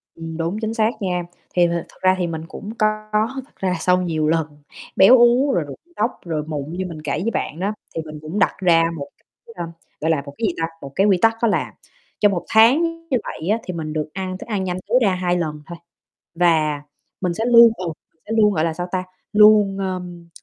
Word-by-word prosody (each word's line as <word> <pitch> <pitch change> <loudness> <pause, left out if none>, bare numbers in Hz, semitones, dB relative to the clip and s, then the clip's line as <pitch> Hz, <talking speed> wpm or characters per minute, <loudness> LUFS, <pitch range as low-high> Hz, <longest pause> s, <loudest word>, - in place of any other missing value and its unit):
Ừm, 165 0 -7
đúng 170 +5 -2
chính 220 0 -2
xác 220 -1 +2
nha, 180 -2 -1 0.3
thì 175 -1 +4
th - - -3
thực 170 +1 -5
ra 185 0 +4
thì 175 - 0
mình 160 -1 -4
cũng 205 - -9
có 215 0 0 0.4
thật - - -31
ra 185 -1 -1
sau 180 +1 +2
nhiều 160 -3 -1
lần 160 -1 +1 0.5
béo 245 +7 +8
uống 245 +4 +4
rồi 170 - +1
rụng 140 -2 -9 0.2
tóc 225 +4 +1
rồi 155 -3 -2
mụn 150 -1 -4
như 185 +1 -3
mình 155 -3 -8
kể 150 - -4
với 230 +3 -1
bạn 160 -4 -3
á, 200 +3 -1 0.2
thì 165 - -1
mình 155 -1 -9
cũng 160 +7 -4
đặt 195 - +2
ra 170 -3 +4
một 140 -1 -6
cái, 230 - -20
ơ, 175 - -4 0.4
gọi 160 +2 +1
là, 155 -3 +1
một 140 - -9
cái 230 - -1
gì 180 - -1
ta, 165 - 0 0.2
một 140 - -8
cái 195 - +3
quy 190 -3 +4
tắc 225 0 +4
đó 235 - +3
là 210 - -1 0.5
trong 205 -1 +4
1 175 - -3
tháng 230 +8 +6 0.3
như 255 - +2
vậy 160 - -6
á 215 - +3
thì 185 - -5
mình 155 -2 -5
được 155 -1 -2
ăn 185 -1 -4
thức - - -10
ăn 205 -4 -1
nhanh 180 -1 -2
tối 245 +4 +4
ra 195 -4 +3
2 180 -1 0
lần 150 -3 -3
thôi. 170 - -9 0.6
Và 155 -4 +2 0.4
mình 180 -2 0
sẽ 225 +6 -2
luôn, 235 -1 +8
ừ, 185 - -5 0.3
mình 160 - -43
sẽ 220 - -6
luôn, 210 -1 +5
gọi 155 - 0
là, 165 - -1
sao 175 +2 -4
ta, 185 -1 -1 0.3
luôn, 210 -2 +6
ơm, 180 -3 -5
180 Hz, 245 wpm, -21 LUFS, 165-210 Hz, 0.6 s, béo